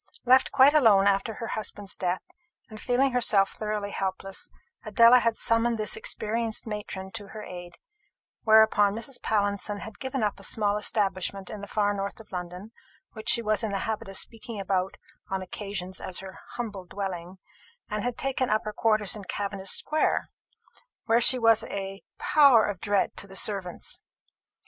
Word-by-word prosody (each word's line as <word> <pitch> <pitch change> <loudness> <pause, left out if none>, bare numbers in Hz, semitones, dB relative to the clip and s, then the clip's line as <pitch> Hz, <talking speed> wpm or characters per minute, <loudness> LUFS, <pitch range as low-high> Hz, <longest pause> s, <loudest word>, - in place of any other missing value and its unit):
Left 260 +2 +5
quite 275 +1 +6
alone 220 -10 +5
after 200 +2 +1
her 230 - -6
husband's 205 -2 -4
death, 180 0 -2 0.5
and 215 -1 -9
feeling 260 +2 +2
herself 215 -5 +3
thoroughly 210 -1 -3
helpless, 195 0 -4 0.3
Adela 235 +1 +6
had 230 -2 0
summoned 230 0 +2
this 215 -1 0
experienced 225 +1 -1
matron 205 -3 -6
to 205 -2 -7
her 215 +1 -9
aid; 175 -1 -9 0.7
whereupon 220 -2 +5
Mrs. 235 +4 -5
Pallinson 205 -1 0
had 220 -1 -9
given 260 -2 -3
up 205 -1 -1
a - - -13
small 205 +1 +1
establishment 195 -2 -1
in 210 - -7
the 200 - -7
far 205 -1 +1
north 200 +1 -4
of 225 - -15
London, 180 +3 -6 0.4
which 220 -1 -4
she 235 - +4
was 215 0 +1
in 220 - -1
the 200 - -1
habit 220 -3 -3
of 195 - -2
speaking 225 -1 -6
about 190 -1 -1 0.3
on 190 -1 -2
occasions 190 -1 -5
as 185 - -4
her 190 0 -8
humble 215 -6 -5
dwelling, 185 -1 -5 0.5
and 210 -1 -3
had 245 -1 -2
taken 265 -1 -1
up 215 +1 +1
her 215 - -4
quarters 215 -2 +2
in 205 -2 -8
Cavendish 200 -1 -4
square, 310 +9 0 0.7
where 230 +1 +3
she 255 +2 +6
was 225 -2 +4
a 195 0 -5 0.2
power 275 -7 +5
of 200 -3 -4
dread 205 -2 +1
to 200 - -4
the 195 - -12
servants. 195 -3 -2
210 Hz, 170 wpm, -27 LUFS, 195-225 Hz, 0.7 s, quite